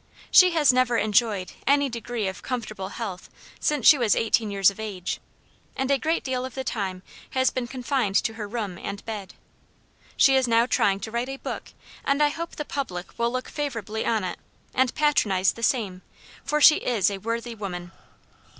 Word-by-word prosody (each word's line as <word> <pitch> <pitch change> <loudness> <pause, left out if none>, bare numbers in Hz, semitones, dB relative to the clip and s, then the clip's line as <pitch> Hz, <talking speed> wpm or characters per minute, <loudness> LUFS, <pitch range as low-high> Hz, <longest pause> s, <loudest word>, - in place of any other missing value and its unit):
She 365 -1 +8
has 300 -5 +5
never 250 -2 +2
enjoyed 215 -3 +1 0.2
any 280 0 +4
degree 235 -3 -3
of 190 - -5
comfortable 215 -6 -4
health 195 -6 -6 0.3
since 295 -6 0
she 295 - +8
was 230 -4 +3
eighteen 225 -1 +1
years 200 -1 +4
of 200 - -15
age, 200 -5 -4 0.6
and 265 +1 -1
a 275 - +3
great 320 +4 0
deal 255 -1 -2
of 260 - -7
the 265 - -3
time 190 -7 -3 0.3
has 260 0 +3
been 250 -2 -3
confined 250 -4 -1
to 225 - +2
her 215 -2 -6
room 205 -5 -4
and 200 0 -6
bed. 205 -4 -6 0.8
She 270 - +6
is 260 -1 +3
now 230 0 +4
trying 200 -5 +1
to 220 - -6
write 235 +3 -2
a 270 - -5
book; - - -6 0.3
and 280 +2 +2
I 295 - +4
hope 335 +3 -6
the 300 - -4
public 190 -13 -5
will 235 0 +2
look 255 0 -3
favorably 225 -7 -3
on 220 -3 0
it, 180 - -4 0.3
and 255 -1 +2
patronize 210 -11 +2
the 230 - -11
same, 210 -7 0 0.4
for 300 - 0
she 305 +1 +8
is 210 -5 +1
a 195 - -5
worthy 230 +3 -3
woman. 180 -5 -6
230 Hz, 190 wpm, -25 LUFS, 200-260 Hz, 0.8 s, She